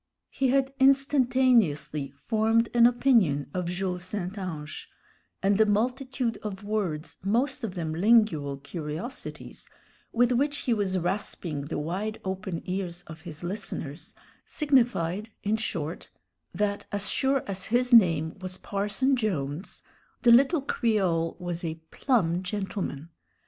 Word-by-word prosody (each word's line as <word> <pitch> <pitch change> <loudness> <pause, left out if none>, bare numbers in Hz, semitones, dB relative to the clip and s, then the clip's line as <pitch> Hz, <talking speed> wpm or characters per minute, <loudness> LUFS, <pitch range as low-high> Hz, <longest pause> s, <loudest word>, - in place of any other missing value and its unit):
He 270 - +1
had 270 +1 +2
instantaneously 250 - +3
formed 220 +9 +1
an 235 0 +7
opinion 225 - +2
of 180 -1 -2
Jules 180 0 -2
St. 185 0 -4
Ange, 160 -6 -6 0.5
and 200 +1 +3
the 220 - +6
multitude 250 +3 0
of 205 -1 -6
words, 190 -7 -3
most 250 +7 0
of 200 -4 -4
them 160 -3 -3
lingual 170 -7 +3
curiosities, 155 - -6 0.4
with 245 +1 +3
which 285 +4 +1
he 245 - +1
was 200 -4 0
rasping 175 -5 -2
the 160 - -3
wide 190 +9 -3
open 190 -2 -4
ears 180 -2 -4
of 160 0 -11
his 160 -1 -9
listeners, 175 -6 -5 0.3
signified, 230 - +1
in 210 +2 +1
short, 165 -7 -4 0.4
that 205 -1 -2
as 205 -1 -2
sure 270 +3 +1
as 190 -1 -4
his 245 +2 +1
name 165 -8 +5
was 185 0 -5
Parson 205 +8 0
Jones, 175 - -3 0.4
the 240 - +7
little 275 +5 +5
Creole 190 -11 +1
was 175 0 -4
a 160 -1 -2 0.2
"plum 180 -10 +1
gentleman." 185 -5 -4
200 Hz, 130 wpm, -27 LUFS, 170-235 Hz, 0.5 s, an